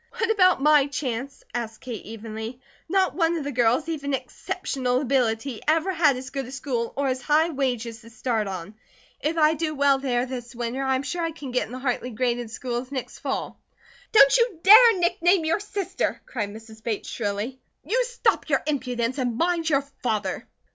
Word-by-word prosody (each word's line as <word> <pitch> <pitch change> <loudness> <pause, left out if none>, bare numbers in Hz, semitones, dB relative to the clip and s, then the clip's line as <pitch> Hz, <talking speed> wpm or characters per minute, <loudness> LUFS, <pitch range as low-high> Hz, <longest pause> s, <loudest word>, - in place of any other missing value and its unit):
"What 455 0 +1
about 370 -9 +4
my 300 -2 +5
chance?" 275 -1 -4
asked 230 -2 -4
Kate 240 -4 -6
evenly. 220 +2 -7 0.3
"Not 380 +1 +2
one 335 -1 +1
of 310 - -3
the 285 - -3
girls, 245 +4 +2
even 285 -4 -1
Exceptional 255 -1 -2
Ability, 250 -3 0
ever 325 +4 +2
had 305 -6 +3
as 260 +1 -8
good 270 -2 -4
a - - -9
school 250 -3 -2
or 280 0 +1
as 255 0 -2
high 310 +5 +3
wages 245 -5 -2
to 230 - -14
start 225 -2 -1
on. 190 +1 -6 0.5
If 320 +3 -1
I 310 0 +5
do 310 0 -2
well 280 -1 +3
there 250 -2 0
this 245 -2 -7
winter, 240 +3 -3
I 265 0 +2
am 260 - -2
sure 345 +4 -3
I 330 - 0
can 295 -5 -8
get 250 - 0
in - - -14
the 255 - -5
Hartley 255 -1 -2
graded 240 0 -1
schools 245 +2 -4
next 265 -3 -5
fall." - - -4 0.5
"Don't 275 -12 +7
you 470 -8 +1
dare 440 +2 +9
nickname 350 0 +2
your 325 +5 +1
sister," 400 -2 -2
cried 215 -5 -3
Mrs. 220 +1 -12
Bates, 220 -2 -3
shrilly. 215 +4 -3 0.3
"You 475 +10 +2
stop 475 -8 0
your 275 -3 +2
impudence 255 -3 -1
and 245 -3 -1
mind 335 0 +1
your 280 -2 +2 0.2
father." 210 -6 -2
265 Hz, 190 wpm, -25 LUFS, 240-315 Hz, 0.5 s, dare